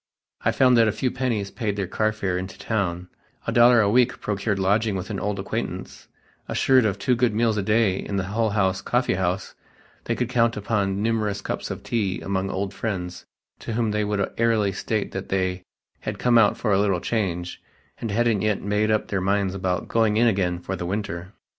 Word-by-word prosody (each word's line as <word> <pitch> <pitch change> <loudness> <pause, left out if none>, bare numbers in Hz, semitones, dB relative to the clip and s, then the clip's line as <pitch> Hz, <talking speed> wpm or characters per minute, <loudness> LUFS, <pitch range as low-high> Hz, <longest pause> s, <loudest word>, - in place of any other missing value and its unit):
I - - +3
found 125 -2 +4
that 115 -1 +5
a - - +3
few 125 +4 -1
pennies 115 -6 -2
paid 105 -3 -2
their 100 -1 -1
car 110 +4 0
fare 100 -4 -2
into 95 +1 -5
town, 90 -5 -2 0.4
a - - -1
dollar 120 0 +6
a 105 - +3
week 125 +4 +3
procured 105 0 -1
lodging 100 +2 +1
with 95 +3 -4
an 100 - -3
old 105 0 -2
acquaintance; 95 - -5 0.4
assured 130 -3 +3
of 100 -1 -2
two 125 +5 +1
good 120 -3 +1
meals 115 -1 +2
a 105 - 0
day 105 -1 +2
in 100 - -4
the 95 - 0
Hull 110 +4 0
House 95 -2 +1
coffee 125 +1 +1
house 95 0 -1 0.5
they - - 0
could 125 - -1
count 115 -2 +2
upon 100 -1 -1
numerous 110 -3 0
cups - - -4
of - - -6
tea 100 -6 -1
among 95 0 -2
old 95 +1 -3
friends 90 -5 -4 0.3
to 115 - -5
whom 115 -1 0
they 105 0 0
would 105 -1 0
airily 115 -4 +2
state 105 +2 -2
that 95 - -5
they 95 -1 0 0.4
had - - -5
"come 120 -1 +4
out 105 -2 +4
for 105 -4 0
a 95 - +3
little 100 -3 +2
change" 90 -5 -2 0.4
and 115 - -3
hadn't 115 -1 +1
yet 105 -2 0
made 105 +2 +1
up 110 -1 +1
their 100 -2 -1
minds 100 0 +1
about 95 -2 -2
"going 110 -2 +2
in 120 - +4
again 95 -6 +1
for 95 +2 -4
the 90 - -4
winter." 95 -2 -4
105 Hz, 210 wpm, -24 LUFS, 95-115 Hz, 0.5 s, dollar